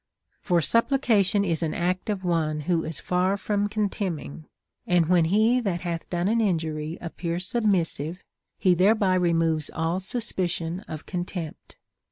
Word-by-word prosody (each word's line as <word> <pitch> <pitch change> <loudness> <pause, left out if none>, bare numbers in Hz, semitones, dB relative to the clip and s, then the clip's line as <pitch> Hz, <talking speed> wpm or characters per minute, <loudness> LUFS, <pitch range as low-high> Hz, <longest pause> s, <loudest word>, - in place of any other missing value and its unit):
t - - -50
For 175 -3 +2
supplication 225 - +2
is 170 -3 0
an 160 -2 -1
act 180 +3 -1
of 200 -3 -2
one 160 -3 0
who 165 +1 0
is 160 -2 -2
far 185 +2 0
from 205 +1 -1
con 210 0 0
temning; 165 -6 -5 0.4
and 175 -2 +3
when 170 0 +3
he 220 +8 +3
that 190 -8 -2
hath 170 -2 -4
done 175 +1 -1
an 230 +2 +2
injury 160 -5 -1
appears 170 +1 -4
submissive, 180 - 0 0.3
he 185 - +3
thereby 195 +2 +3
removes 165 -4 +1
all 165 +3 -1
suspicion 185 -5 -1
of 155 -1 -7
contempt. 175 -3 -6
180 Hz, 155 wpm, -25 LUFS, 165-200 Hz, 0.4 s, and